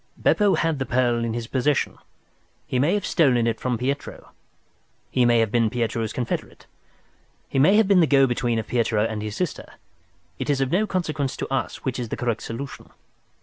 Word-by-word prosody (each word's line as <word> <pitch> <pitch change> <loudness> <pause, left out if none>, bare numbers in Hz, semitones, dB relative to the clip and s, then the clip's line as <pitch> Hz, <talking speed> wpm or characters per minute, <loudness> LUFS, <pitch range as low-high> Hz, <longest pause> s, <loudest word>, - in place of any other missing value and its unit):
Beppo 205 -2 +3
had 165 -3 0
the 135 - -1
pearl 120 -2 +1
in 115 -1 -2
his 120 -1 -3
possession. 135 +4 0 0.7
He 125 - -1
may 155 +9 +2
have 205 - -2
stolen 130 -9 +3
it 115 -1 -1
from 125 -2 -1
Pietro, 135 +4 -4 0.8
he 125 -1 +3
may 120 0 +4
have 110 -2 0
been 115 -1 +2
Pietro's 115 -2 -2
confederate, 120 -2 -4 0.8
he 135 - -1
may 160 +9 +5
have 220 -2 +4
been 195 -2 +5
the 165 - +4
go 135 -2 +5
between 120 -2 0
of 110 - -2
Pietro 110 -3 +1
and 110 -2 -3
his 105 -1 -5
sister. 180 +2 -4 0.7
It 130 - -3
is 140 -2 +2
of 135 0 0
no 210 +5 +2
consequence 155 -8 -2
to - - -4
us 135 - -3
which 130 -2 -2
is 120 -2 -4
the - - -4
correct 115 -2 -1
solution. 125 +4 -7
125 Hz, 195 wpm, -23 LUFS, 115-145 Hz, 0.8 s, may